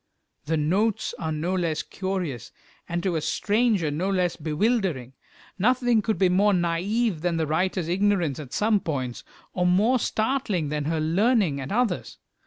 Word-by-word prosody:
The 160 Hz, +1 st, 0 dB
notes 190 Hz, +8 st, 0 dB
are 160 Hz, -1 st, -2 dB
no 160 Hz, +4 st, -2 dB
less 170 Hz, -4 st, -1 dB
curious, 185 Hz, -, -4 dB, 0.4 s
and 170 Hz, 0 st, -2 dB
to 180 Hz, -4 st, 0 dB
a -, -, -2 dB
stranger 205 Hz, -3 st, +1 dB
no 170 Hz, +7 st, -1 dB
less 180 Hz, -3 st, +1 dB
bewildering. 160 Hz, -, -1 dB, 0.5 s
Nothing 245 Hz, +1 st, +3 dB
could 220 Hz, +1 st, -1 dB
be 190 Hz, -, +4 dB
more 200 Hz, +3 st, +3 dB
naïve 180 Hz, +3 st, 0 dB
than 175 Hz, -1 st, 0 dB
the 160 Hz, -, 0 dB
writer's 175 Hz, +2 st, 0 dB
ignorance 180 Hz, -5 st, +1 dB
at 140 Hz, -4 st, -8 dB
some 210 Hz, -, +2 dB
points, 130 Hz, -8 st, -4 dB, 0.3 s
or 180 Hz, -1 st, +1 dB
more 215 Hz, +8 st, +3 dB
startling 215 Hz, -, -1 dB
than 150 Hz, -1 st, -2 dB
her 160 Hz, +1 st, 0 dB
learning 175 Hz, -, +2 dB
at 135 Hz, -, -6 dB
others. 225 Hz, -4 st, -1 dB
180 Hz, 160 wpm, -25 LUFS, 155-210 Hz, 0.5 s, be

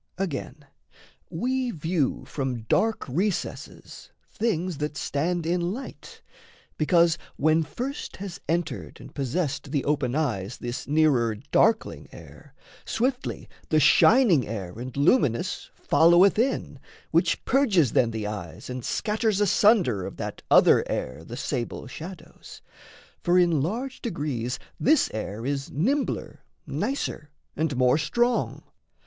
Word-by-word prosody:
Again, 150 Hz, -5 st, -4 dB, 0.6 s
we 255 Hz, +8 st, -1 dB
view 160 Hz, -, -1 dB
From 130 Hz, -5 st, -3 dB
dark 220 Hz, -, +1 dB
recesses 185 Hz, +10 st, -4 dB, 0.2 s
things 185 Hz, -7 st, -1 dB
that 150 Hz, +1 st, -3 dB
stand 165 Hz, +5 st, -1 dB
in 175 Hz, +2 st, +1 dB
light, 200 Hz, +10 st, -6 dB, 0.5 s
Because, 170 Hz, +1 st, +3 dB, 0.2 s
when 155 Hz, +2 st, +3 dB
first 245 Hz, -, -5 dB
has 190 Hz, -2 st, -7 dB
entered 165 Hz, -5 st, -2 dB
and -, -, -12 dB
possessed 145 Hz, +1 st, -2 dB
The 140 Hz, -1 st, -1 dB
open 140 Hz, -4 st, 0 dB
eyes 120 Hz, -9 st, -1 dB
this 120 Hz, 0 st, -5 dB
nearer 140 Hz, -7 st, +3 dB, 0.2 s
darkling 225 Hz, 0 st, +2 dB
air, -, -, -14 dB, 0.3 s
Swiftly 255 Hz, +3 st, -2 dB, 0.2 s
the 155 Hz, -, +4 dB
shining 175 Hz, -, +5 dB
air 100 Hz, -5 st, -5 dB
and 125 Hz, +2 st, -7 dB
luminous 140 Hz, -, +1 dB
Followeth 175 Hz, +5 st, +5 dB
in, 260 Hz, +4 st, -1 dB, 0.3 s
which -, -, +1 dB
purges 200 Hz, -, +3 dB
then 120 Hz, -, +3 dB
the 110 Hz, -2 st, -4 dB
eyes 100 Hz, -1 st, -6 dB
And 125 Hz, -1 st, -5 dB
scatters 215 Hz, -, 0 dB
asunder 195 Hz, -, +3 dB
of -, -, -9 dB
that -, -, -5 dB
other -, -, +6 dB
air 65 Hz, +6 st, -3 dB
The 120 Hz, +8 st, -8 dB
sable 125 Hz, -2 st, -3 dB
shadows, 165 Hz, +7 st, -10 dB, 0.6 s
for 175 Hz, +1 st, +3 dB
in 170 Hz, -5 st, +3 dB
large 240 Hz, -, -3 dB
degrees 145 Hz, -, -3 dB, 0.2 s
This 310 Hz, +3 st, +3 dB
air 110 Hz, +1 st, -5 dB
is 140 Hz, 0 st, -2 dB
nimbler, 265 Hz, -, -1 dB, 0.3 s
nicer, 260 Hz, -, -3 dB, 0.3 s
and 150 Hz, -3 st, -1 dB
more 125 Hz, +3 st, +4 dB
strong. 240 Hz, +11 st, 0 dB
155 Hz, 125 wpm, -26 LUFS, 130-195 Hz, 0.6 s, other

